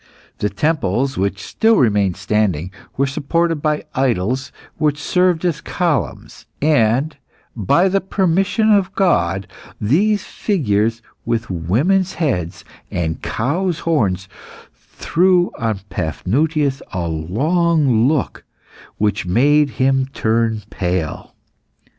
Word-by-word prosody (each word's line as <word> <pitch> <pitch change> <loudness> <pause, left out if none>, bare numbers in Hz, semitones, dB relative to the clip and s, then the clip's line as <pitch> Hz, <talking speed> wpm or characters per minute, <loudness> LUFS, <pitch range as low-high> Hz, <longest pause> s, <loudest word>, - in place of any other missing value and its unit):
The 105 - 0
temples, 135 - 0
which 100 0 -2
still 225 +1 +2
remained 100 - +2
standing, 95 -3 0 0.3
were 140 - +2
supported 165 +5 0
by 150 +1 -1
idols 130 0 0 0.3
which 150 -1 +1
served 180 +1 +1
as 165 -2 -1
columns, 150 - -2
and 140 0 +2 0.4
by 125 - +2
the 195 +1 +1
permission 195 +4 +1
of 195 -2 +2
God 95 - +1 0.3
these 195 - +2
figures 115 - -1 0.2
with 115 -2 -2
women's 140 - +1
heads 110 - -2 0.2
and 80 -2 -3
cow's 160 - -1
horns, 95 - 0 0.5
threw 180 +1 +1
on 110 -4 -1
Paphnutius 135 - -1
a 90 -2 -2
long 130 - +1
look 150 -2 -1 0.5
which 105 -3 0
made 145 +9 +3
him 135 0 +2
turn 110 -2 0
pale. 90 -4 -3
130 Hz, 105 wpm, -19 LUFS, 100-165 Hz, 0.5 s, made